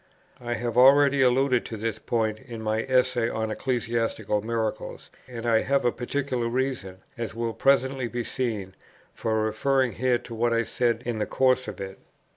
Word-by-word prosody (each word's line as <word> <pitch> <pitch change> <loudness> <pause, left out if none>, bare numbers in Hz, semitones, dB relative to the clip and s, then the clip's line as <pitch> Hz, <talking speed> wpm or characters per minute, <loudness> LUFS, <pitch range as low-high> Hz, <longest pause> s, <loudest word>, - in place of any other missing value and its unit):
I 120 -1 -3
have 120 0 -3
already 140 +1 +6
alluded 130 0 +3
to 110 - -6
this 110 0 -3
point 110 -2 -1
in 120 -4 -9
my 110 +1 0
Essay 125 -2 +2
on 110 -1 -2
Ecclesiastical 115 -3 -1
Miracles, 110 0 -4 0.2
and 120 -2 -7
I 115 -1 +3
have 140 0 +1
a 120 - +4
particular 125 -1 -2
reason, 115 -7 -3 0.2
as 115 -2 -4
will 115 0 -2
presently 135 -1 +2
be 120 0 -3
seen, 110 -7 -3 0.4
for 110 -1 -1
referring 130 +4 +1
here 125 +1 +1
to 120 - -11
what 115 +1 +1
I 115 0 +2
said 120 +1 0
in 120 -2 -2
the 105 - -1
course 130 -1 +2
of 105 -3 -7
it. 95 0 -7
120 Hz, 175 wpm, -26 LUFS, 110-130 Hz, 0.4 s, already